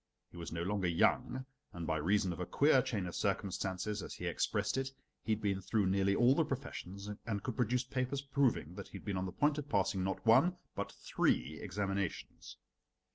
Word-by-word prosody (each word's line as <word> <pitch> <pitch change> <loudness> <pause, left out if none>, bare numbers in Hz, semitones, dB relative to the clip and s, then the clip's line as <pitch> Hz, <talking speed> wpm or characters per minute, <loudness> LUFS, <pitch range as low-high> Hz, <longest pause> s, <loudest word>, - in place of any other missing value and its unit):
He - - -12
was 85 - -6
no 85 0 -2
longer 95 0 0
young, 120 +9 +2 0.3
and 85 -1 -5
by 80 - 0
reason 95 +3 +2
of 85 - -9
a 90 - -1
queer 140 -2 +5
chain 110 -7 -2
of 90 - -5
circumstances, 100 0 -1
as - - -7
he - - -6
expressed - - 0
it, 135 0 -1 0.3
he 110 - 0
had 110 - -3
been 100 -2 0
through 105 +1 +1
nearly 100 +1 +2
all 120 +4 +6
the 160 - +3
professions 100 - -5 0.2
and 100 -3 -2
could 125 - -3
produce 125 0 +1
papers 130 +2 -2
proving 140 -2 +1
that - - -7
he - - -8
had - - -13
been 100 -2 -1
on 95 0 -1
the - - -5
point 145 +8 +2
of 145 0 -6
passing 95 -3 +1
not 95 +3 -2
one 170 +11 +5 0.2
but - - -3
three 75 +6 0
examinations. 100 -1 -3
100 Hz, 205 wpm, -35 LUFS, 95-125 Hz, 0.3 s, all